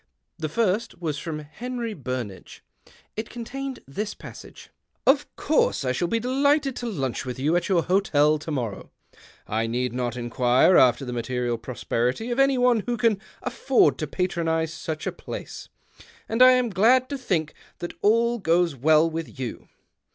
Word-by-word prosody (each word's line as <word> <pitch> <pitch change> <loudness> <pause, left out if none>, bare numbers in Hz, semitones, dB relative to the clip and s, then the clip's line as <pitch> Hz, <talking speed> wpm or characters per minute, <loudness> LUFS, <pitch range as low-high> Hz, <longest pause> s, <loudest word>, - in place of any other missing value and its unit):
The 155 -1 -2
first 210 0 0
was 155 -5 -3
from 160 -1 -4
Henry 235 +9 -5
Burnage. 125 - -6 0.5
It 220 +1 -4
contained 265 +3 -6
this 205 +10 -4 0.5
" - - -24
Of 280 +2 +2
course 300 - +1
I 125 - +1
shall 150 +7 -1
be 230 +5 0
delighted 275 +2 +1
to 240 - -4
lunch 135 - -2
with 125 0 -5
you 150 +6 +1
at 175 +2 0
your 175 -4 +3
hotel 155 -5 +3
to 155 - -8
morrow. 120 -9 -4 0.6
I 110 +1 -1
need 125 +1 -1
not 125 -1 -2
inquire 125 +7 +3
after 125 +1 +5
the 125 - -5
material 120 0 -2
prosperit}^ 125 - -2
of 240 - -1
an}^ 275 -1 +4
one 245 -2 +4
who 240 -1 0
can 215 -3 +2 0.2
aftbrd 240 - +2
to 155 - -3
patronize 165 -2 -1
such 160 -2 -5
a - - -1
place, - - -8 0.6
and 225 +2 -1
I 255 0 +9
am 250 -2 +1
glad 240 +7 +4
to 285 - -3
think 165 -11 -1 0.2
that 175 - -6
all 235 +3 +3
goes 170 -3 +2
well 155 +5 +4
with 165 -2 -5
you. 125 -3 -6
170 Hz, 165 wpm, -25 LUFS, -, 0.6 s, I